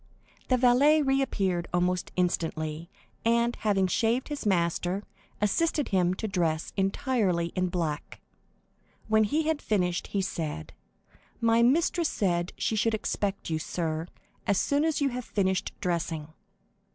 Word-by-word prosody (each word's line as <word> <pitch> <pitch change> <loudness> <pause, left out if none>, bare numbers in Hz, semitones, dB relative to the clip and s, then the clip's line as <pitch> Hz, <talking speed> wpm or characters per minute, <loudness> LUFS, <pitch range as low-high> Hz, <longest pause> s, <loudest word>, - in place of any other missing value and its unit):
The 255 - +3
valet 270 +5 +5
re 270 0 +2
appeared 185 -9 -1
almost 180 +1 0
instantly, 165 -2 -1 0.3
and, 235 +1 +2
having 200 -3 +2
shaved 230 +8 +1
his 290 -6 -4
master, 175 +1 0 0.4
assisted 295 +8 +1
him 180 -1 +2
to 220 - -3
dress 165 -5 -1
entirely 195 -4 0
in 185 -1 +1
black. 165 -4 -3 0.9
When 220 0 +4
he 305 +9 +1
had 315 -1 0
finished, 180 -4 0
he 200 - -1
said: 155 - -4 0.7
"My 230 0 +3
mistress 320 +6 +3
said 175 -3 0
she 220 - 0
should 220 +1 +2
expect 200 -4 -2
you, 160 - 0
sir, 160 0 -3 0.4
as 200 - +3
soon 285 +8 +2
as 320 -2 0
you 280 - +3
had 250 0 -4
finished 190 -4 0
dressing." 165 -3 -2
195 Hz, 140 wpm, -28 LUFS, 175-240 Hz, 0.9 s, valet